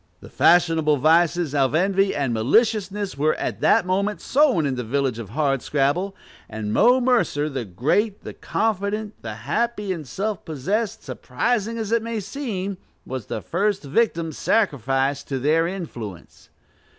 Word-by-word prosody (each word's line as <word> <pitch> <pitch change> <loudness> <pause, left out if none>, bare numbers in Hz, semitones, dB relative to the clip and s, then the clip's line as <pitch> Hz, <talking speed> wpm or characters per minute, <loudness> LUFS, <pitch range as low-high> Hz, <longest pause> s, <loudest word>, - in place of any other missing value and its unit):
The - - -13
fashionable 165 -3 +4
vices 165 +1 +3
of 135 0 +2
envy 195 +3 +2
and 140 -4 -1
maliciousness 195 - +1
were 155 +2 +2
that - - +2
moment 200 +3 0
sown 265 - +2
in 140 - 0
the 125 -1 -3
village 130 0 -1
of 110 -5 -7
Hardscrabble; 145 - 0 0.3
and 110 -1 -4
Mo 250 +2 +5
Mercer, 240 - +1
the 135 -5 -4
great, 155 - 0
the - - -7
confident, 210 0 -2
the 110 -2 -6
happy 230 -4 -1
and 155 -5 -8
self 205 - -3
possessed, 205 - -2
surprising 230 - -2
as 220 -2 -4
it 230 0 +3
may 230 0 -3
seem, 200 -4 -4 0.3
was 130 -4 -6
the - - -4
first 200 +2 0
victim 165 +1 0
sacrificed 140 - 0
to 135 - -2
their 155 +5 +2
influence. 120 - -8
170 Hz, 145 wpm, -23 LUFS, 135-210 Hz, 0.3 s, Mo